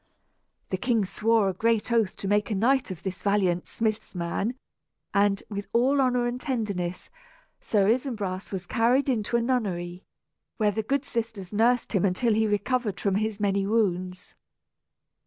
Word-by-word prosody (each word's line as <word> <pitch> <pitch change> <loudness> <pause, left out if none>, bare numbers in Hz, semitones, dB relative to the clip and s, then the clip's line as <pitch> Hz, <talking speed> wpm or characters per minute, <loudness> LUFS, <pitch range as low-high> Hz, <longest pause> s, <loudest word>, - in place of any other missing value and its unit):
The 185 - 0
king 230 -4 +1
swore 220 +2 +2
a 190 - 0
great 225 +4 +1
oath 225 -5 +2
to 195 - -5
make 205 +2 +2
a 215 - 0
knight 255 +6 +2
of 185 -4 -7
this 190 -1 -4
valiant 190 -4 +1
"smith's 220 -3 -2
man"; 180 +7 -2 0.6
and, 200 0 +2
with 205 -1 -5
all 265 +4 +3
honor 250 -2 +2
and 240 +1 -3
tenderness, 200 - -3 0.5
Sir 200 -3 +1
Isumbras 215 -6 -1
was 190 -2 -4
carried 245 +6 +2
into 235 -1 +1
a 235 - 0
nunnery, 185 -8 -2 0.5
where 210 -2 +2
the 220 +2 -1
good 275 +5 -1
sisters 225 -7 -4
nursed 235 +4 +2
him 195 - +2
until 200 +4 +2
he 220 +1 +2
recovered 210 -1 0
from 200 - 0
his 215 +1 -1
many 200 -1 +1
wounds. 185 -4 -1
210 Hz, 160 wpm, -26 LUFS, 195-235 Hz, 0.6 s, all